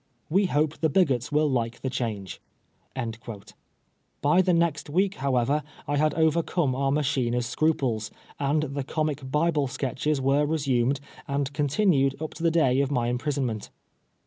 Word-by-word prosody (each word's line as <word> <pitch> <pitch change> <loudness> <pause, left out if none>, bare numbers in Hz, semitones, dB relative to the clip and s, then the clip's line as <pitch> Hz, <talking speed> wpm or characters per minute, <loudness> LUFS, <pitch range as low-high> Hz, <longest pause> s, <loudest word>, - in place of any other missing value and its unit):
We 195 +3 +3
hope 150 -1 0
the 160 - +2
bigots 140 -7 +2
will 150 +1 +3
like 120 -4 -1
the 130 - -2
change." 110 -7 -4 1.8
By 150 +6 +4
the 185 0 +2
next 170 -4 +1
week, 190 +6 +1
however, 135 0 +1 0.3
I 145 0 0
had 155 +1 +2
overcome 160 -2 +1
our 135 +1 0
machiner's 130 -4 0
scruples, 120 -5 0 0.3
and 145 +2 +1
the 140 -1 -3
Comic 150 0 -2
Bible 150 0 +1
Sketches 135 +3 -1
were 135 +2 +2
resumed 140 -3 +1 0.3
and 140 0 -1
continued 145 -2 +2
up 155 0 -5
to 165 - -10
the 165 - +3
day 140 -5 +3
of 140 - 0
my 120 -4 0
imprisonment. 125 -4 -2
140 Hz, 145 wpm, -26 LUFS, 130-155 Hz, 1.8 s, By